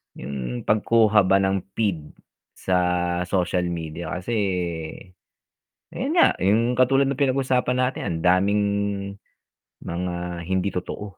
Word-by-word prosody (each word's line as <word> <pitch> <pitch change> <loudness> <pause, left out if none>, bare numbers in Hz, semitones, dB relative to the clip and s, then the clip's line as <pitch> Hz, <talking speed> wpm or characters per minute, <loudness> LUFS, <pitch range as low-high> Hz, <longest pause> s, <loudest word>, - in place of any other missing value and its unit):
'yon 65 -2 -5
pagkuha 110 -2 +3
ba 95 - +4
ng 95 0 +1 0.2
feed 90 -9 -2 0.4
sa 95 - -1 0.5
social 90 -1 0
media 80 -1 -5
kasi, 90 +6 -5 1.6
ayun 275 +6 -3
nga, 345 - +6
'yong 115 +6 +2
katulad 135 +2 +4
ng 135 - -4
pinag-usapan 130 -2 +1
natin 125 +1 0
ang 80 -1 -2
daming 90 +1 +4 1.4
mga 90 +1 -3 0.4
hindi 95 +1 +1
totoo. 90 +2 -5
95 Hz, 115 wpm, -23 LUFS, 90-125 Hz, 1.6 s, nga